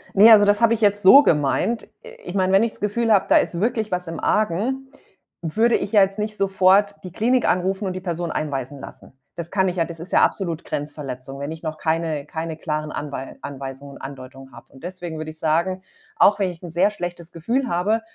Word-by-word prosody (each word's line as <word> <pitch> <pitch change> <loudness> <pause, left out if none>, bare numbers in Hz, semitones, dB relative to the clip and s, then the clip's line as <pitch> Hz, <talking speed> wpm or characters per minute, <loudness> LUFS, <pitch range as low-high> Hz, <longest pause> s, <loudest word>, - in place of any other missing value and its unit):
Ne, 215 +4 +8
also 205 -2 +8
das 205 +2 +2
habe 230 0 +5
ich 225 - -2
jetzt 205 -1 +2
so 275 +10 +9
gemeint. 150 - +1 0.2
I 480 - -11 0.2
ich - - -6
meine, 185 -1 +1
wenn 195 +3 +5
ich's 230 - -3
Gefühl 220 +2 0
habe, 200 - +4
da - - +6
ist 170 - 0
wirklich 220 -1 -1
was 180 -1 -2
im 165 - -5
Argen, 235 +7 -1 0.5
würde 220 +9 +2
ich 205 - -2
ja 210 -2 +6
jetzt 195 +2 +1
nicht 215 0 -3
sofort 195 +1 +3
die 180 - -8
Klinik 245 +5 +1
anrufen 190 +3 0
und 185 - -2
die 185 - -6
Person 170 -2 -3
einweisen 140 -2 -4
lassen. - - -12 0.2
Das 170 -1 -6
kann 190 -2 +2
ich 180 - -6
ja 165 - +2
das 165 -1 -9
ist 180 - -8
ja - - +4
absolut 170 -5 0
Grenzverletzung, 135 -2 -6
wenn 140 +2 -4
ich 160 +1 -9
noch 155 -1 -4
keine 160 -2 -1
keine 160 0 -5
klaren 155 -1 -3
Anwei 140 -2 -6
Anweisungen 140 0 -8
und - - -13
Andeutungen 135 0 -10
habe. - - -13
Und 135 - -16
deswegen 175 -3 -6
würde 155 0 -6
ich 155 - -13
sagen, 170 +4 0 0.4
auch 210 - +5
wenn 195 -2 +1
ich 175 -1 -10
'n 175 -3 -8
sehr 180 +4 +3
schlechtes 175 -3 -7
Gefühl 235 +10 -2
habe, 205 +6 0
180 Hz, 225 wpm, -22 LUFS, 155-205 Hz, 0.5 s, so